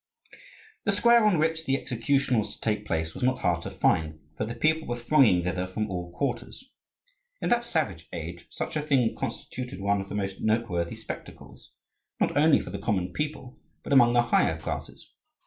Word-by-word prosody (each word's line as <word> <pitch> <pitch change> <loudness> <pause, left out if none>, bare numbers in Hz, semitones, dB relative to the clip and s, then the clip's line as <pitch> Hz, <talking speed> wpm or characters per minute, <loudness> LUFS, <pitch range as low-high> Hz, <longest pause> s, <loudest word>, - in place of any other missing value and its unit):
The 200 - +2
square 235 +3 +5
on 205 -5 +4
which 160 +1 0
the 135 0 +1
execution 125 +1 +1
was 105 - -4
to - - -24
take 105 -1 -1
place 80 0 -1
was - - -9
not 130 +1 +1
hard 85 -1 +1
to - - -5
find: 80 -1 +1 0.2
for 110 - -2
the 115 +2 -5
people 160 0 +1
were 120 - -1
thronging 120 - +4
thither 90 +1 -2
from 105 +2 -3
all 90 -1 -4
quarters. 145 - -4 0.7
In - - -1
that 240 0 +2
savage 105 - -1
age 85 +1 -7
such - - -5
a 150 - +1
thing 135 -6 +2
constituted 125 0 -5
one 100 0 +1
of 95 - -9
the - - -5
most 100 -1 -3
noteworthy 110 -6 0
spectacles, - - -10 0.5
not - - +1
only 150 +1 +5
for - - -7
the - - -5
common 90 -5 -1
people, 145 -2 -4 0.2
but - - -2
among 120 -3 +6
the 120 0 +4
higher 80 -8 +2
classes. - - -6
120 Hz, 190 wpm, -27 LUFS, 90-145 Hz, 0.7 s, among